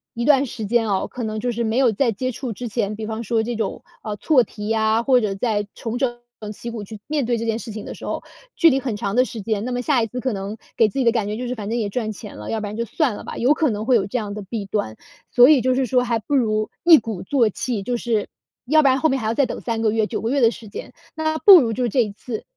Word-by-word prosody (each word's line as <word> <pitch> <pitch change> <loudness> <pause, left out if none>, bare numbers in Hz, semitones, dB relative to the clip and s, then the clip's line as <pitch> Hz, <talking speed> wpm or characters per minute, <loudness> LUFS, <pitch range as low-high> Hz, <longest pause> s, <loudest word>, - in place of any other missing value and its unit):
一 235 - -2
段 280 -1 +5
时 225 -3 -6
间 225 +1 +1
哦， 195 - 0
可 245 - -6
能 215 0 -3
就 245 +2 -1
是 235 +1 -2
没 220 +2 -1
有 260 -3 +4
在 235 +3 +1
接 255 +5 -3
触 245 0 -5
之 245 +3 -6
前， 215 -2 -2
比 220 - -5
方 220 +1 -4
说 225 +1 0
这 240 +1 -3
种， 220 -3 -3 0.2
啊， 210 -2 -4
错 255 +2 +3
题 210 0 -8
呀， 220 +1 +2
或 255 -2 +4
者 200 -2 -1
在 205 -1 -1
重 230 +1 -4
整 245 -2 -1 0.3
旗 235 - -7
鼓 230 -3 -6
去 210 +1 -10
面 295 -3 0
对 240 0 0
这 230 - -3
件 225 0 0
事 230 -1 -7
情 215 0 -7
的 - - -7
时 - - -10
候， - - -3 0.3
距 335 - +6
离 270 -2 +2
很 250 -5 -3
长 200 +1 -3
的 255 - +4
时 235 -4 -7
间， 215 +1 -2
那 250 - -3
么 245 0 -1
下 250 -3 +2
一 - - -1
次 250 +3 -6
可 260 0 -1
能 200 +1 -4 0.2
给 225 - +5
自 270 - -4
己 255 - +1
的 230 - +5
感 220 -4 -1
觉 210 - -3
就 250 - -4
是 250 - -3
反 205 -2 -6
正 235 +2 -1
也 210 -3 -1
赚 220 0 -2
钱 205 - -10
了， 105 - -6
要 225 - -1
不 210 - -4
然 205 - -6
就 235 +1 -2
算 250 - 0
了 - - -8
吧， - - -7
有 250 +4 +2
可 300 -5 +1
能 210 +1 -3
会 250 0 +4
有 195 -4 +2
这 225 +5 -3
样 210 -2 -5
的 210 -1 -6
弊 205 +1 -5
端。 195 - -2 0.4
所 245 +3 +7
以 295 -4 +6
就 255 0 +2
是 260 +1 +1
说 250 0 +2
还 235 -2 0
不 280 +7 -2
如 215 -4 +1
一 340 -2 +9
鼓 215 -5 -6
作 235 +1 +2
气 225 0 -3
就 240 +4 -2
是 225 -3 -1 0.4
要 310 +2 +5
不 - - +5
然 265 +1 +3
后 315 - +3
面 265 - 0
还 220 - -5
要 225 - +1
再 275 +2 +2
等 - - -5
3 230 -2 -2
个 220 - +2
月、 220 0 +1
9 215 -2 -4
个 225 - -1
月 280 +2 +1
的 230 -1 +5
时 225 -2 -11
间， - - -8 0.2
那 315 0 -1
不 385 -4 +9
如 225 -2 -1
就 245 +1 0
这 245 +3 +2
一 210 - -5
次 220 +2 -7
230 Hz, 330 characters per minute, -22 LUFS, 215-250 Hz, 0.4 s, 一